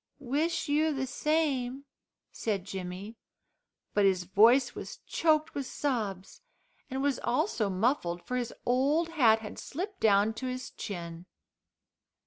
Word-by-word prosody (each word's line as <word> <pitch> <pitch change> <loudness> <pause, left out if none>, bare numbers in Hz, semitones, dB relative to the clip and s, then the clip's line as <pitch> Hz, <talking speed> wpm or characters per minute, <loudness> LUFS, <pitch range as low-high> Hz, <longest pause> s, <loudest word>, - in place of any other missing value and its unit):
"Wish 290 +6 -1
you 305 +2 +2
the 265 -2 -1
same," 275 -2 0 0.5
said 200 -5 -2
Jimmy, 190 +3 -6 0.8
but 205 - +3
his 190 -2 +3
voice 230 +7 +5
was - - -7
choked 310 -1 +2
with 275 -2 -3
sobs, 210 -9 -3 0.5
and 265 +1 -2
was 280 -3 +1
also 245 - 0
muffled, 185 -4 0
for 250 - -3
his 245 -2 -2
old 285 +7 +2
hat 235 -9 +4
had 210 - -8
slipped 380 +6 -5
down 210 0 +4
to 255 +4 -5
his 255 0 -5
chin. 170 -3 -7
245 Hz, 130 wpm, -30 LUFS, 200-285 Hz, 0.8 s, voice